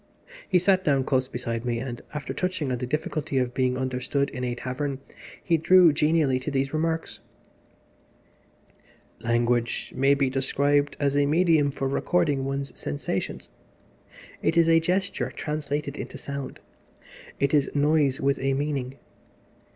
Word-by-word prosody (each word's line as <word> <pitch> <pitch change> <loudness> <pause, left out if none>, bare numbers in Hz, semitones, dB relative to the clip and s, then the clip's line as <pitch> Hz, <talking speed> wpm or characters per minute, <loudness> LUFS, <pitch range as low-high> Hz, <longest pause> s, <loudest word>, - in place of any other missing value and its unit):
He 185 - +4
sat 185 +1 +3
down 140 -4 +2
close 130 -1 +1
beside 115 -3 -4
me, 120 -1 -1
and, 120 0 -5
after 150 -1 -5
touching 180 -7 -2
on 125 - -1
the 125 - -3
difficulty 150 0 -2
of 125 -1 0
being 125 -1 +1
understood 130 +2 -1
in 125 - -5
a 120 -1 -1
tavern, 130 +3 -3 0.5
he 170 -2 +2
drew 175 0 +6
genially 150 -3 +2
to 130 - -4
these 135 0 -1
remarks 160 +1 -2 2.0
"Language 120 0 0
may 135 +2 +4
be 140 -1 +1
described 140 +2 +1
as 140 -1 +1
a 145 0 +3
medium 160 -2 +3
for 135 -1 -3
recording 145 -1 +1
one's 135 0 -3
sensations. 70 0 -4 0.9
It 165 - +1
is 165 -1 +5 0.2
gesture 185 +2 -1
translated 150 -1 -3
into - - -6
sound. 140 -2 -6 0.8
It 140 +1 +1
is 145 -2 +3
noise 145 -2 +2
with 140 +1 +1
a 135 0 0
meaning. 135 -2 -2
140 Hz, 145 wpm, -26 LUFS, 130-155 Hz, 2.0 s, drew